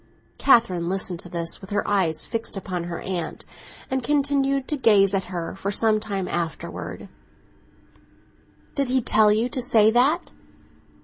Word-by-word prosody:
Catherine 185 Hz, -10 st, +3 dB
listened 185 Hz, -2 st, -1 dB
to 175 Hz, -, -10 dB
this 170 Hz, -1 st, -4 dB
with 190 Hz, -, -11 dB
her 205 Hz, -, -1 dB
eyes 175 Hz, -6 st, +1 dB
fixed 225 Hz, -2 st, -4 dB
upon 180 Hz, -3 st, -4 dB
her 170 Hz, -1 st, -5 dB
aunt, 180 Hz, -3 st, -4 dB, 0.5 s
and 265 Hz, 0 st, 0 dB
continued 275 Hz, -1 st, +1 dB
to 300 Hz, -, +1 dB
gaze 205 Hz, -7 st, +4 dB
at 195 Hz, -1 st, 0 dB
her 175 Hz, -2 st, -5 dB
for 195 Hz, +1 st, -4 dB
some 215 Hz, +1 st, +3 dB
time 200 Hz, -3 st, -3 dB
afterwards. 165 Hz, -2 st, -5 dB, 1.7 s
"Did 275 Hz, -3 st, -1 dB
he 260 Hz, -1 st, +1 dB
tell 215 Hz, -1 st, +4 dB
you 220 Hz, +3 st, +1 dB
to 255 Hz, 0 st, -3 dB
say 220 Hz, -3 st, +4 dB
that?" 270 Hz, +9 st, +2 dB
210 Hz, 150 wpm, -23 LUFS, 180-250 Hz, 1.7 s, gaze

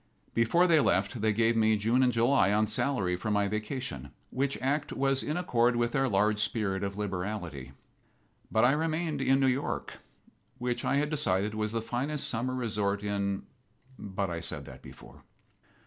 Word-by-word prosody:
Before 115 Hz, +11 st, +3 dB
they 165 Hz, -3 st, +5 dB
left 100 Hz, 0 st, +1 dB
they 110 Hz, 0 st, +3 dB
gave 115 Hz, +2 st, +2 dB
me 110 Hz, -1 st, +3 dB
June 115 Hz, +5 st, +2 dB
and 125 Hz, -1 st, +4 dB
July, 115 Hz, -3 st, +3 dB
on 105 Hz, +1 st, +3 dB
salary, 110 Hz, -4 st, 0 dB
for 90 Hz, +4 st, -4 dB
my 105 Hz, -1 st, +2 dB
vacation, 105 Hz, -, -4 dB, 0.2 s
which 135 Hz, +1 st, -1 dB
act 140 Hz, +3 st, -1 dB
was 135 Hz, 0 st, +1 dB
in 155 Hz, -, -2 dB
accord 120 Hz, -8 st, +2 dB
with 120 Hz, 0 st, +1 dB
their 135 Hz, +1 st, +1 dB
large 105 Hz, +1 st, +2 dB
spirit 105 Hz, -2 st, -1 dB
of 100 Hz, 0 st, -3 dB
liberality. 90 Hz, -9 st, -4 dB, 0.8 s
But 110 Hz, +2 st, +4 dB
I 125 Hz, -, +5 dB
remained 155 Hz, 0 st, -1 dB
in 135 Hz, +1 st, +3 dB
New 135 Hz, -, +3 dB
York, 130 Hz, +2 st, -2 dB, 0.6 s
which 125 Hz, 0 st, -2 dB
I -, -, +1 dB
had 150 Hz, +2 st, 0 dB
decided 105 Hz, -7 st, +1 dB
was 110 Hz, 0 st, -2 dB
the 115 Hz, -1 st, -2 dB
finest 135 Hz, +6 st, -2 dB
summer 130 Hz, +2 st, -2 dB
resort 105 Hz, -4 st, -1 dB
in 100 Hz, -1 st, -1 dB, 0.6 s
But 100 Hz, -2 st, -3 dB
I 85 Hz, -, -3 dB
said 85 Hz, -, -3 dB
that -, -, -12 dB
before. -, -, -14 dB
115 Hz, 175 wpm, -29 LUFS, 100-130 Hz, 0.8 s, they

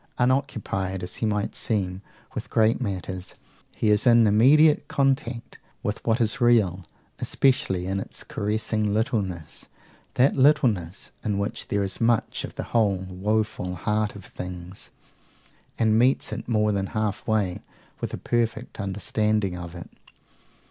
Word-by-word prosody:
Unoccupied, 110 Hz, -8 st, 0 dB
as 90 Hz, -, -4 dB
he 110 Hz, -, 0 dB
might 105 Hz, -1 st, -1 dB
seem, 95 Hz, -4 st, -1 dB, 0.3 s
with -, -, -5 dB
great 110 Hz, +3 st, +3 dB
matters, 95 Hz, -4 st, -4 dB, 0.4 s
he 105 Hz, -, +2 dB
is 105 Hz, +3 st, +3 dB
in 115 Hz, -1 st, +7 dB
immediate 140 Hz, +9 st, +5 dB
contact 135 Hz, -4 st, -1 dB, 0.2 s
with 105 Hz, +1 st, -3 dB
what 115 Hz, +1 st, +1 dB
is 115 Hz, +3 st, 0 dB
real, 105 Hz, -7 st, +3 dB, 0.4 s
especially 125 Hz, -9 st, +1 dB
in 95 Hz, +1 st, -1 dB
its -, -, -6 dB
caressing 105 Hz, 0 st, -1 dB
littleness, 95 Hz, -, -2 dB, 0.5 s
that 130 Hz, +3 st, +4 dB
littleness 120 Hz, -, +2 dB
in 105 Hz, -2 st, -1 dB
which 100 Hz, +1 st, -3 dB
there 100 Hz, -1 st, 0 dB
is 95 Hz, +3 st, -4 dB
much 115 Hz, -1 st, +1 dB
of -, -, -7 dB
the -, -, -3 dB
whole 105 Hz, -5 st, +3 dB
woeful 100 Hz, -1 st, -1 dB
heart 105 Hz, +3 st, -1 dB
of 100 Hz, -2 st, -10 dB
things, 90 Hz, +1 st, -8 dB, 0.9 s
and 110 Hz, -1 st, +3 dB
meets 130 Hz, +3 st, +2 dB
it -, -, -6 dB
more 105 Hz, -2 st, +2 dB
than 100 Hz, -1 st, -1 dB
half 110 Hz, -2 st, -2 dB
way 105 Hz, -5 st, 0 dB, 0.4 s
with -, -, -3 dB
a -, -, -4 dB
perfect 120 Hz, 0 st, -2 dB
understanding 105 Hz, 0 st, 0 dB
of 85 Hz, -1 st, -7 dB
it. 85 Hz, -, -8 dB
105 Hz, 140 wpm, -25 LUFS, 95-115 Hz, 0.9 s, in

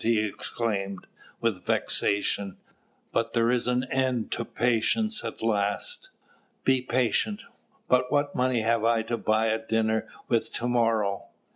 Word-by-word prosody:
he 115 Hz, 0 st, +3 dB
exclaimed, 100 Hz, -2 st, -3 dB, 0.4 s
with 105 Hz, -6 st, 0 dB
vexation; 100 Hz, 0 st, 0 dB, 0.5 s
"but 115 Hz, -, 0 dB
there 115 Hz, 0 st, +3 dB
is 125 Hz, -1 st, +1 dB
an 125 Hz, 0 st, +1 dB
end 130 Hz, -3 st, 0 dB
to 115 Hz, -, -1 dB
patience 125 Hz, -, +1 dB
at 115 Hz, -1 st, -6 dB
last. 110 Hz, -, 0 dB, 0.5 s
Be 130 Hz, -1 st, +3 dB
patient! 130 Hz, -, 0 dB, 0.4 s
but 125 Hz, 0 st, +2 dB
what 145 Hz, 0 st, +1 dB
money 125 Hz, -2 st, +1 dB
have 115 Hz, 0 st, +1 dB
I 115 Hz, -1 st, +3 dB
to 115 Hz, +1 st, -2 dB
buy 110 Hz, +1 st, +2 dB
a 110 Hz, 0 st, +1 dB
dinner 110 Hz, -1 st, 0 dB, 0.2 s
with 115 Hz, -2 st, 0 dB
to 120 Hz, -, -2 dB
morrow? 110 Hz, -5 st, +1 dB
115 Hz, 140 wpm, -27 LUFS, 110-125 Hz, 0.5 s, he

